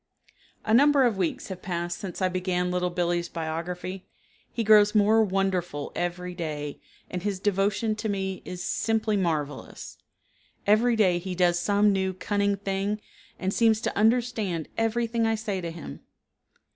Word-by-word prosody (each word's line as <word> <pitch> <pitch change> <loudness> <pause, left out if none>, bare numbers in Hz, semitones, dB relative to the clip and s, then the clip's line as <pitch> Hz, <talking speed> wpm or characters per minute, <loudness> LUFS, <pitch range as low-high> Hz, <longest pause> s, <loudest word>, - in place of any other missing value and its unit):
A 215 - +1
number 285 +3 +6
of 240 -4 +3
weeks 180 +1 -2
have 185 -1 -6
passed 175 -1 -3
since 190 -1 -5
I - - +4
began 180 0 -1
Little 180 0 0
Billee's 175 -1 -1
biography. 175 +3 -5 0.4
He 230 - -2
grows 210 0 +6
more 215 +2 +5
wonderful 185 -6 -1
every 180 +1 -3
day, 150 -4 -5 0.3
and 180 - -4
his 200 -1 -2
devotion 205 +2 +1
to 220 - -3
me 190 -2 -2
is 180 -1 -6
simply 220 -1 0
marvelous. 155 -7 -3 0.7
Every 225 +4 +4
day 185 -5 +3
he 185 +1 -5
does 175 -1 +3
some 205 +2 +3
new 190 -1 -1
cunning 200 +1 0
thing 195 +1 -2 0.4
and 190 +1 -2
seems 225 -2 +3
to - - -2
understand 220 -6 +1
everything 230 0 0
I 225 - +2
say 210 -4 -3
to 170 - -4
him. 165 - -8
195 Hz, 155 wpm, -26 LUFS, 175-215 Hz, 0.7 s, number